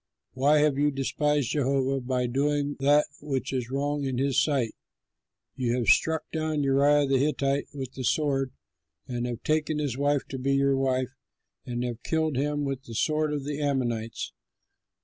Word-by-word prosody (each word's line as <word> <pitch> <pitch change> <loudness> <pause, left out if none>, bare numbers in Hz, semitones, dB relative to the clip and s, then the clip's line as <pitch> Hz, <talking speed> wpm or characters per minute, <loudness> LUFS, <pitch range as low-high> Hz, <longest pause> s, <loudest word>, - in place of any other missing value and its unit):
Why 140 +4 +4
have 145 -2 +2
you 145 +1 +4
despised 145 -1 0
Jehovah 135 -1 +1
by 125 0 -1
doing 145 +3 0
that 145 +2 +4 0.2
which 135 -3 -3
is 125 -2 -2
wrong 145 +2 -1
in 130 -2 -2
his 135 +1 +2
sight? 135 -7 0 0.8
You 120 -2 0
have 120 - +1
struck 160 0 +3
down 155 -2 -1
Uriah 140 +2 +4
the 135 -1 +2
Hittite 140 -1 0
with 135 -3 -6
the 130 - -6
sword, 135 0 +1 0.6
and 120 -1 -2
have 120 -1 -5
taken 155 0 0
his 140 -4 -2
wife 145 0 +1
to 135 - -5
be 135 +2 +1
your 140 0 +3
wife, 130 -1 0 0.6
and 120 0 -2
have 120 -1 -4
killed 160 -3 0
him 145 +2 0
with 135 0 -4
the 115 - -8
sword 155 +4 +1
of 145 -2 -2
the 145 +1 -4
Ammonites. 120 - -2
140 Hz, 170 wpm, -27 LUFS, 130-145 Hz, 0.8 s, Why